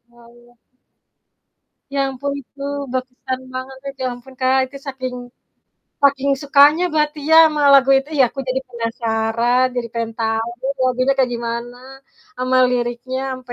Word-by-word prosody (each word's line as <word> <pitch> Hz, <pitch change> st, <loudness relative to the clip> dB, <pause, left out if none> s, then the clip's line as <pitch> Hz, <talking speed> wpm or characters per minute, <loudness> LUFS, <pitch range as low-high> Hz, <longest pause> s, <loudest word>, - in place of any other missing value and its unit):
Ah 235 Hz, -1 st, -18 dB
iya. 240 Hz, 0 st, -21 dB, 1.4 s
Ya 280 Hz, -, -1 dB
ampun, 280 Hz, +2 st, -4 dB
itu 275 Hz, +2 st, -17 dB, 0.3 s
berkesan 255 Hz, 0 st, -4 dB
banget 260 Hz, +1 st, -6 dB
itu. 275 Hz, -, -11 dB
Ya 255 Hz, -, 0 dB
ampun 245 Hz, +2 st, -13 dB
Kak, 260 Hz, +1 st, +3 dB, 0.3 s
saking 255 Hz, -2 st, -5 dB, 0.9 s
saking 280 Hz, 0 st, +3 dB
sukanya 290 Hz, +4 st, +5 dB
berarti 300 Hz, 0 st, 0 dB
ya, 320 Hz, -, +7 dB
sama 300 Hz, -1 st, -1 dB
lagu 275 Hz, -1 st, +6 dB
itu 280 Hz, +3 st, -7 dB
ya, -, -, +7 dB
aku 270 Hz, -, -6 dB
jadi 260 Hz, +1 st, 0 dB
penasaran, 230 Hz, +1 st, 0 dB
jadi 235 Hz, -1 st, -2 dB
pengen 230 Hz, -1 st, -3 dB
tahu 225 Hz, +1 st, -1 dB, 0.4 s
lagunya 255 Hz, +2 st, +2 dB
kayak 260 Hz, -2 st, +2 dB
gimana 235 Hz, +1 st, -4 dB, 0.6 s
sama 255 Hz, +1 st, 0 dB
liriknya 245 Hz, +1 st, -2 dB
sampe 255 Hz, -1 st, -8 dB
255 Hz, 140 wpm, -19 LUFS, 240-270 Hz, 1.4 s, ya